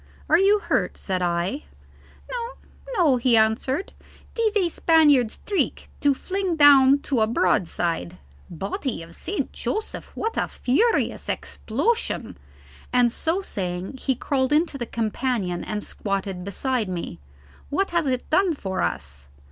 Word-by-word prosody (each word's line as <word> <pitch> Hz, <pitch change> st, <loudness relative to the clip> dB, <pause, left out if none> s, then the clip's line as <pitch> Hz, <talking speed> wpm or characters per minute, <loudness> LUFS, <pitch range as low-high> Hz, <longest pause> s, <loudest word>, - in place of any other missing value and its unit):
"Are 325 Hz, -, +5 dB
you 400 Hz, +2 st, +5 dB
hurt?" 410 Hz, -, -1 dB
said 185 Hz, -2 st, -2 dB
I. 175 Hz, -, -1 dB, 0.7 s
"No, 485 Hz, 0 st, -4 dB, 0.4 s
no," 305 Hz, -8 st, +4 dB
he 240 Hz, -1 st, +3 dB
answered. 230 Hz, -, +1 dB, 0.4 s
"'Tis 440 Hz, -2 st, +1 dB
a 370 Hz, -4 st, +2 dB
Spaniard's 295 Hz, -9 st, +4 dB
trick 405 Hz, -2 st, -1 dB
to 285 Hz, -1 st, +3 dB
fling 375 Hz, +2 st, -2 dB
down 280 Hz, -2 st, +7 dB
to 265 Hz, -6 st, 0 dB
a 215 Hz, -, +3 dB
broadside. 175 Hz, -, 0 dB, 0.3 s
Body 195 Hz, -, -4 dB
of 165 Hz, +1 st, -13 dB
St. 395 Hz, -, -4 dB
Joseph, 430 Hz, +1 st, -4 dB
what 450 Hz, +1 st, -2 dB
a -, -, +1 dB
furious 445 Hz, -, +1 dB
explosion!" 445 Hz, -, -2 dB, 0.6 s
and 245 Hz, -1 st, +4 dB
so 330 Hz, +9 st, -1 dB
saying 185 Hz, -, -4 dB
he 265 Hz, 0 st, 0 dB
crawled 260 Hz, +1 st, 0 dB
into 310 Hz, 0 st, +2 dB
the 240 Hz, -, -3 dB
companion 220 Hz, -5 st, -2 dB
and 210 Hz, -1 st, -4 dB
squatted 195 Hz, -2 st, -3 dB
beside 225 Hz, +2 st, -1 dB
me. 170 Hz, -, -5 dB, 0.5 s
"What 390 Hz, +7 st, 0 dB
has 340 Hz, -4 st, +1 dB
it 255 Hz, -1 st, -1 dB
done 360 Hz, 0 st, +3 dB
for 190 Hz, -8 st, -3 dB
us?" 70 Hz, +1 st, -4 dB
260 Hz, 140 wpm, -24 LUFS, -, 0.7 s, down